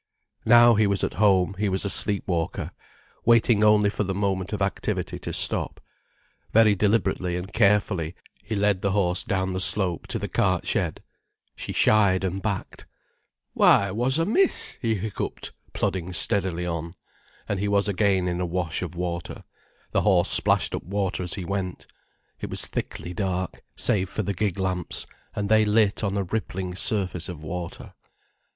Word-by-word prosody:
Now 120 +1 +7
he 105 -1 +3
was 100 -1 0
at - - -1
home, 95 -2 +3
he 105 -1 +1
was 95 +1 -1
a - - 0
sleep 100 -2 +2
walker, 85 -3 -2 0.5
waiting 115 -2 +4
only 105 -1 +4
for 105 - -2
the 95 -1 -3
moment 95 -2 -1
of 105 - -3
activity 95 0 -2
to - - -6
stop. - - +1 0.7
Very 110 -1 +5
deliberately 100 -3 0
and 95 +4 -7
carefully, 100 -6 +1 0.3
he 110 +2 -4
led 100 -2 +1
the 100 -1 0
horse 90 -3 +1
down 95 -1 -1
the 95 - -2
slope 90 -1 +1
to - - -2
the - - -4
cart - - 0
shed. - - -1 0.5
She - - -6
shied 100 -3 +3
and 95 +1 -2
backed. 100 -2 -5 0.7
"Why, 100 -1 +4
wha's 125 +7 0
amiss?" 220 - 0
he 115 -2 0
hiccupped, 105 +1 -5 0.2
plodding 90 -1 -2
steadily 90 -1 0
on. 85 -1 -4 0.5
And 100 - -2
he 105 - -1
was 100 0 +1
again 95 -2 +1
in 90 0 -2
a - - 0
wash 85 -2 -2
of 90 -1 -5
water, 85 -1 -5 0.5
the - - +1
horse 95 -4 +2
splashed - - +4
up - - -3
water 95 0 -2
as 90 -1 -2
he 95 - -5
went. 95 -1 -4 0.5
It - - -5
was - - -1
thickly 90 - -5
dark, 95 -2 -3
save 95 -3 +3
for 110 - -3
the 100 - -2
gig 100 0 -2
lamps, 95 -2 -1 0.3
and 100 -1 -2
they 110 +1 +4
lit 105 -1 +2
on 100 -1 -1
a 100 - 0
rippling 95 -2 -4
surface 95 -3 0
of 80 -4 -8
water. 85 +1 -6
95 Hz, 170 wpm, -25 LUFS, 90-105 Hz, 0.7 s, Now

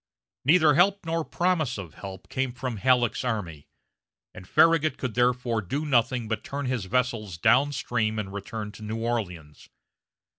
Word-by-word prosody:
Neither 155 0 +5
help 195 +5 +3
nor 165 0 -1
promise 160 -8 0
of 90 -6 -8
help 95 -2 -9
came 130 -1 -2
from 125 -2 -4
Halleck's 125 +1 +2
army, 95 - -4 0.7
and 90 -1 -11
Farragut 160 - +4
could 125 -4 -4
therefore 120 -1 +1
do 140 - -3
nothing 120 -3 +1
but 110 0 -3
turn 140 0 -4
his 125 -6 -2
vessels 115 -5 -1
down 130 - +4
stream 110 -5 -1
and 100 -2 -4
return 105 +1 -5
to 110 - -14
New 110 +1 -4
Orleans. 95 -10 -4
120 Hz, 155 wpm, -26 LUFS, 105-135 Hz, 0.7 s, Neither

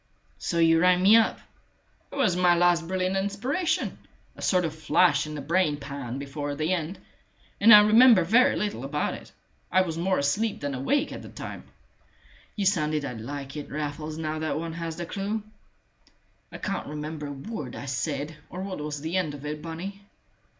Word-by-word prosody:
"So 170 - -2
you 165 -1 +5
rang 180 +1 +4
me 205 +4 +8
up!" 225 -1 +4 0.7
"It - - -8
was 265 -11 +2
my 180 -1 +4
last 175 -1 +3
brilliant 185 +1 -1
inspiration 235 - -1 0.4
a - - -12
sort 180 -2 +2
of 160 - -3
flash 155 -1 +2
in 155 - -6
the 145 - -5
brain 155 0 +1
pan 140 -4 -6
before 145 +1 -4
the 155 +5 0
end 175 +1 -3 0.6
and 225 +3 +7
I 210 -1 +11
remember 220 -1 +7
very 230 +9 +4
little 210 0 -2
about - - -1
it. - - -10 0.4
I 185 - +5
was 165 -2 -4
more 185 +2 +1
asleep 205 +11 0
than 145 -1 -2
awake 135 - 0
at - - -7
the - - -10
time." - - -8 0.9
"You 205 - -1
sounded 155 -6 +1 0.2
like 140 +3 -6
it, 150 - -6
Raffles, 150 +1 -4
now 155 -1 -3
that 155 -1 -2
one 165 +1 -4
has 165 -1 -5
the 175 - -5
clue." 205 +4 -3 1.1
"I - - -7
can't 195 -2 -3
remember 150 0 -5
a - - -6
word 140 - -6
I - - -7
said, 145 +3 -3
or 185 +1 -6
what 195 -3 -5
was 150 -1 -4
the 160 +4 -2
end 155 -6 -1
of 145 0 -10
it, 150 0 -4
Bunny." 175 +5 -7
165 Hz, 185 wpm, -26 LUFS, 150-190 Hz, 1.1 s, I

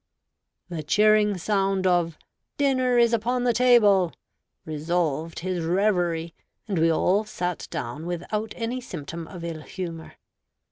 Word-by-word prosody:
The 170 -3 -4
cheering 210 +4 +3
sound 195 0 0
of 175 -3 +2 0.4
"Dinner 255 -3 +2
is 235 -1 +4
upon 245 +2 0
the 245 -1 +3
table" 210 -7 +5 0.5
dissolved 160 0 -2
his 180 -1 -2
reverie, 175 -2 +1 0.3
and 195 -6 -1
we 165 +1 +4
all 190 +6 +2
sat 180 -5 -4
down 145 +8 -5
without 210 +5 -3
any 240 +2 -3
symptom 165 - -7
of 175 -2 -9
ill 165 -2 -5
humor. 165 -1 -7
185 Hz, 130 wpm, -25 LUFS, 165-215 Hz, 0.5 s, table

